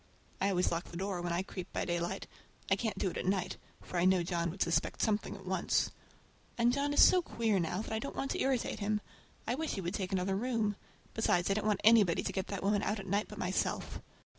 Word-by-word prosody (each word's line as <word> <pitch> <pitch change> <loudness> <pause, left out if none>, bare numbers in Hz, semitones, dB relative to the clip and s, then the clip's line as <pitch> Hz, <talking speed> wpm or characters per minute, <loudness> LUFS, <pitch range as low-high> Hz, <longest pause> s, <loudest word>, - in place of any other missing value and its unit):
I 195 - +3
always 185 -2 +2
lock 170 +1 -1
the 170 - -8
door 190 -1 -2
when 175 0 -2
I 175 +2 0
creep 185 -1 -7
by - - -2
daylight. 175 +2 -2 0.5
I - - +6
can't 220 +2 -2
do 190 - 0
it - - -6
at - - -3
night, 190 -2 0 0.3
for 180 - -5
I 175 - +3
know 185 -1 +4
John 170 -1 -1
would 185 +4 0
suspect 170 - 0
something 210 -2 0
at 195 -1 -12
once. 185 -1 +1 0.7
And 240 +1 +4
John 280 +1 0
is 290 - +7
so 365 - +7
queer 225 - 0
now, 180 +4 -1
that - - -5
I 220 - 0
don't 280 - -5
want 275 - -2
to - - -1
irritate 265 -3 0
him. 210 0 0 0.5
I 235 - 0
wish 315 +4 -2
he 195 - -3
would 175 +1 -3
take 190 -3 -3
another 190 0 0
room! 220 -2 0 0.4
Besides, 190 -4 +2
I - - +5
don't 215 +1 -1
want 210 -2 +1
anybody 215 -6 +5
to - - -3
get 190 0 -2
that 200 -2 -4
woman 200 0 +2
out 210 0 -1
at 195 - -7
night 200 +2 0
but 210 - -10
myself. 185 -1 -1
195 Hz, 245 wpm, -33 LUFS, 180-220 Hz, 0.7 s, is